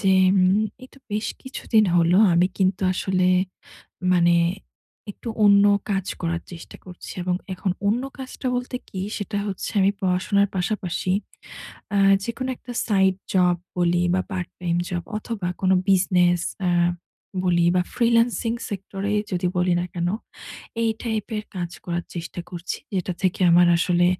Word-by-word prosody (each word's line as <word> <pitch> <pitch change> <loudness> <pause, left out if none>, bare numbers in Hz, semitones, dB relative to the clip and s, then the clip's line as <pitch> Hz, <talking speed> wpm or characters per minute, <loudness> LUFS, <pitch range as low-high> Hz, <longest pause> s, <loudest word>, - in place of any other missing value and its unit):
যে 195 -2 +3 0.2
উম 185 +1 +4 0.3
এইতো 260 +2 -14
বেশ 210 +1 -1 0.2
কিছুদিন 230 -4 +1
হল, 170 0 +4 0.2
আমি 175 +2 +4
কিন্তু 190 0 +1
আসলে 185 0 0 0.9
মানে 175 -1 +4 0.8
একটু 230 - -9 0.2
অন্য 200 0 +6 0.3
কাজ 195 -2 0
করার 170 0 -2
চেষ্টা 170 -1 -10
করছি। 180 -1 -10
এবং 180 0 0 0.2
এখন 185 +1 -2 0.2
অন্য 225 +5 +2 0.2
কাজটা 260 0 -7
বলতে 250 +1 -3
কি 185 - -6 0.2
সেটা 205 0 -3
হচ্ছে 195 -2 -4
আমি 195 +1 +4
পড়াশোনার 195 +2 +2
পাশাপাশি, 185 -1 -1 0.8
আ - - +4 0.3
যেকোনো 255 +3 -3
একটা 245 - -9
সাইড 190 -3 +3 0.2
জব 180 -2 +4 0.2
বলি 175 0 +2
বা 185 - +2
পার্ট 185 -3 -3
টাইম 170 -1 0
জব, 175 -1 -3 0.2
অথবা 210 -4 -4
কোন 185 - +2 0.2
বিজনেস 180 -2 +3 0.3
আ - - +3 0.7
বলি 175 -1 +3
বা, 180 - +4
ফ্রিল্যান্সিং 235 -1 +2 0.2
সেক্টর 195 -1 -6
এ - - +1 0.2
যদি 180 0 0
বলি 180 0 +2
না - - -1
কেন, 175 0 -1 0.7
এই 225 - +2
টাইপ 220 -3 -2
এর 210 - -4
কাজ 175 -1 -3
করার 175 -1 -2
চেষ্টা 170 +1 -5
করছি, 175 0 -5 0.2
যেটা 185 -1 -1
থেকে 185 0 0
আমার 175 +1 +6
আসলে 175 0 +3
185 Hz, 150 wpm, -23 LUFS, 175-205 Hz, 0.9 s, অন্য